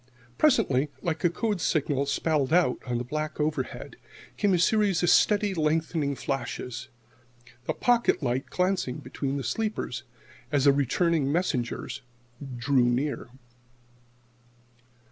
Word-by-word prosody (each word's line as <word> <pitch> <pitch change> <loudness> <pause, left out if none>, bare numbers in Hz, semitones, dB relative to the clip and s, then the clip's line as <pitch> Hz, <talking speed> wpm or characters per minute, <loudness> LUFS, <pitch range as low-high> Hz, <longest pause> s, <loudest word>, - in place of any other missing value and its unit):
Presently, 150 - +3
like 165 -4 -2
a 175 - +5
code 205 +1 -2
signal 145 -3 0
spelled 145 -1 0
out 170 -7 +3
on 120 -1 -1
the 120 - -2
black 155 +5 -4
overhead, 150 -3 -3 0.4
came 205 -2 +2
a 180 - +4
series 195 -1 +2
of 175 - +4
steadily 205 -1 +4
lengthening 155 -2 0
flashes 125 -3 -4 0.8
the - - 0
pocket 240 -9 +2
light 125 +1 -1
glancing 180 -8 0
between 140 0 -4
the 135 - -3
sleepers, 125 - -2 0.5
as 145 -3 +2
the 140 - +7
returning 145 +2 +1
messengers 140 -8 -2 0.6
drew 130 +1 +2
near. 125 0 -1
150 Hz, 125 wpm, -27 LUFS, 135-180 Hz, 0.8 s, the